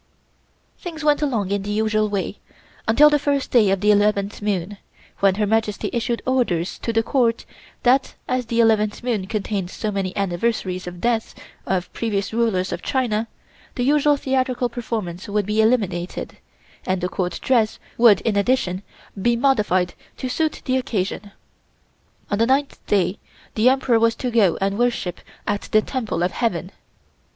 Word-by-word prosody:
Things 320 -3 -7
went 295 0 +3
along 225 -10 0
in 200 0 0
the 200 - -6
usual 215 0 +1
way 200 0 -3 0.5
until 290 +7 +6
the 295 - +3
first 280 -1 -1
day 225 -5 +5
of 195 -1 +1
the 210 0 +4
eleventh 205 0 +1
moon, 200 -1 -2 0.4
when 195 -1 +4
Her 210 +1 +1
Majesty 215 -1 0
issued 235 0 -1
orders 230 -10 0
to 230 - -2
the 225 0 +2
Court 235 -2 +1 0.4
that 260 +2 +3
as 255 -2 -1
the 230 0 -1
eleventh 215 -1 +2
moon 220 -6 -1
contained 200 -3 -2
so 215 +2 -3
many 195 -2 -3
anniversaries 185 -1 -1
of 180 - -6
the - - -13
deaths 235 -2 0 0.3
of 185 -2 -1
previous 205 -3 -2
rulers 220 -6 +1
of - - -4
China, 230 -5 0 0.5
the 245 - -1
usual 290 +2 +3
theatrical 260 -2 0
performance 220 -6 -5
would 205 -1 0
be 210 +2 +2
eliminated 195 -7 -1 0.5
and 185 0 -1
the 180 - -1
Court 180 -2 -3
dress 230 -5 +2 0.2
would 230 -4 +6
in 225 -3 0
addition 200 -3 +1 0.4
be 240 +4 +3
modified 210 -9 +2 0.2
to 255 - -4
suit 310 +4 -1
the 260 0 +1
occasion. 205 -4 -3 1.0
On 205 - 0
the 230 - +3
ninth 275 +2 0
day 200 -1 +1 0.3
the 225 +3 +4
Emperor 260 -3 +2
was 230 0 +3
to 250 0 -3
go 210 -7 +3
and 195 +2 -1
worship 240 -7 -1 0.2
at 205 -1 -2
the 215 0 +4
Temple 230 -9 -2
of 180 - +1
Heaven. 185 -6 -2
215 Hz, 165 wpm, -22 LUFS, 195-245 Hz, 1.0 s, until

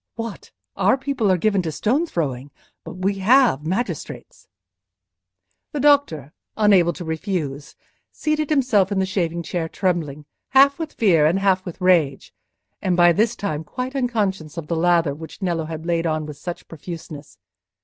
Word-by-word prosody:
What! 230 -2 -7 0.2
our - - +3
people 265 -7 0
are 185 - +3
given 200 +1 +1
to 165 -3 -3
stone 260 - 0
throwing; 140 - -3 0.3
but - - -8
we 195 +2 -1
have 220 - +4
magistrates." 190 - -4 1.3
The 295 - -2
doctor, 275 - +2 0.2
unable 195 -5 +4
to 175 - -8
refuse, 160 -4 -4 0.4
seated 305 -1 -1
himself 240 -10 +2
in 200 - -1
the 190 - +2
shaving 170 -3 -2
chair, 165 -1 -3
trembling, 160 -7 -2 0.2
half 275 +2 +5
with 320 -2 -5
fear 170 -9 +3
and 170 +4 +2
half 190 -1 +2
with 175 - -8
rage, 170 -7 +2 0.5
and 180 -2 0
by 175 0 +6
this 220 +6 +1
time 160 -8 -3
quite 255 - -5
unconscious 200 - -2
of 165 - -4
the 170 - -2
lather 165 -3 +2
which 160 +2 -10
Nello 170 -5 -1
had 160 0 -7
laid 170 -1 0
on 155 -1 -1
with 150 -2 -8
such 175 +3 -7
profuseness. 160 -2 -9
180 Hz, 160 wpm, -22 LUFS, 160-215 Hz, 1.3 s, by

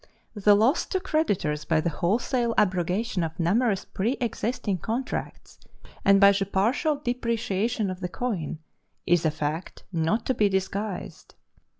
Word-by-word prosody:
The 205 -1 +4
loss 230 +10 +2
to 375 - -1
creditors 200 - 0
by 160 -2 +1
the 170 +2 0
wholesale 230 - 0
abrogation 185 +1 +1
of 160 +1 -5
numerous 195 +4 +1
preëxisting 225 -3 -2
contracts, 235 +4 -4 0.4
and 195 0 +5
by 200 0 +8
the 195 -1 0
partial 235 - +1
depreciation 230 -5 -1
of 185 - -7
the 180 -2 -4
coin, 185 -10 -3 0.5
is 170 -2 +3
a - - +3
fact 155 +2 -4
not 170 +7 0
to 260 - +1
be 210 -4 +2
disguised. 190 +1 -4
200 Hz, 135 wpm, -26 LUFS, 180-235 Hz, 0.5 s, by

